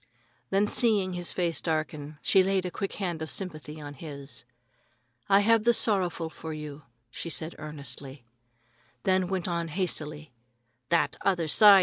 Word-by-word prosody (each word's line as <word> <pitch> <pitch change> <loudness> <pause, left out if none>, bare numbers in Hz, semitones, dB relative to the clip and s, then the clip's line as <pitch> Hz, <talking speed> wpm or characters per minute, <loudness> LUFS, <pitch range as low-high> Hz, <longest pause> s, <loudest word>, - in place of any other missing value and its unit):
Then 200 +2 +2
seeing 205 -5 +3
his 175 -1 +3
face 170 -3 0
darken, 155 -2 -3
she 190 - +5
laid 190 0 +1
a 180 - -3
quick 195 +1 -4
hand 175 -5 -3
of 160 - -3
sympathy 155 -3 -4
on 145 -1 -8
his. 140 -4 -9 0.8
"I 200 0 +6
have 225 +1 +4
the 235 +1 +5
sorrowful 180 -7 +1
for 160 0 -7
you," 150 -1 -7 0.3
she 165 +3 -6
said 160 +3 +1
earnestly, 140 -3 -5 0.8
then 185 -1 +2
went 190 -1 -2
on 170 -1 -1
hastily: 155 -4 -2 0.6
"That 170 - +2
other 180 -4 +1
side! 200 +4 +8
170 Hz, 150 wpm, -28 LUFS, 150-190 Hz, 0.8 s, side